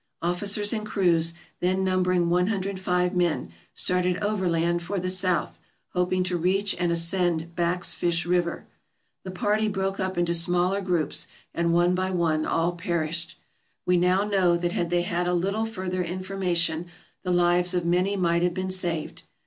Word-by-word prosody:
Officers 200 +5 0
and 215 -2 -2
crews, 170 -5 +1 0.2
then 185 +1 +1
numbering 185 -2 +2
105 185 0 0
men, 175 - 0 0.2
started 180 0 +1
overland 175 -5 0
for 190 +3 -3
the 185 +1 -1
south, 185 -3 0 0.3
hoping 180 0 0
to 180 -1 -1
reach 195 +4 +1
and 175 -1 +1
ascend 170 -1 0
Back's 175 +1 0
Fish 170 -2 0
River. 175 -1 0 0.6
The 190 - -7
party 210 +4 0
broke 195 -1 -2
up 190 -1 -2
into 175 -1 +1
smaller 175 +3 +1
groups 175 -6 -1 0.3
and 170 0 +1
one 175 +1 +3
by 185 +1 0
one 165 -4 0
all 165 +1 +1
perished. 170 -2 -2 0.5
We 180 - +3
now 180 +2 +3
know 190 -4 +2
that 175 0 -1
had 170 -1 -1
they 175 0 +1
had 175 0 -1
a 180 - +1
little 200 +5 0
further 185 -4 -3
information 175 -2 0 0.3
the 185 - -4
lives 175 0 +3
of 175 -1 0
many 180 +4 +1
might 170 -2 +2
have 175 0 +1
been 185 0 -2
saved. 175 -4 -1
180 Hz, 160 wpm, -26 LUFS, 170-185 Hz, 0.6 s, one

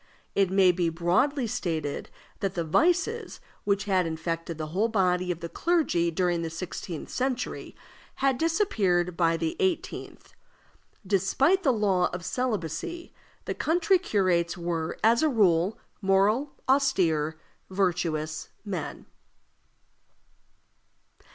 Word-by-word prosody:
It 195 -2 +2
may 190 -1 +5
be 175 -1 0
broadly 180 - +1
stated 165 -10 -3 0.3
that 195 -1 -2
the 170 - 0
vices 355 - +1 0.3
which 200 -1 +1
had 185 -4 +1
infected 165 0 -3
the 155 -1 -4
whole 205 +5 +2
body 185 -4 +1
of 170 -1 -5
the 170 - -4
clergy 300 - +1
during 175 0 0
the 165 - -3
sixteenth 165 0 -6
century 255 -1 -3 0.4
had 265 -2 +1
disappeared 210 - +1
by 165 -1 +2
the 165 -1 -2
eighteenth; 375 -3 -3 0.7
despite 210 - +2
the 285 -8 +3
law 195 -6 +2
of 175 -1 -5
celibacy, 250 - -3 0.3
the - - -2
country 350 +3 +2
curates 185 - +1
were, 170 -2 -3
as 230 +2 +5
a 315 - +3
rule, 195 - +3 0.2
moral, 205 +8 +2
austere, 170 - +2 0.3
virtuous 170 -5 -1 0.2
men. 180 -7 -5
185 Hz, 120 wpm, -27 LUFS, 170-250 Hz, 0.7 s, may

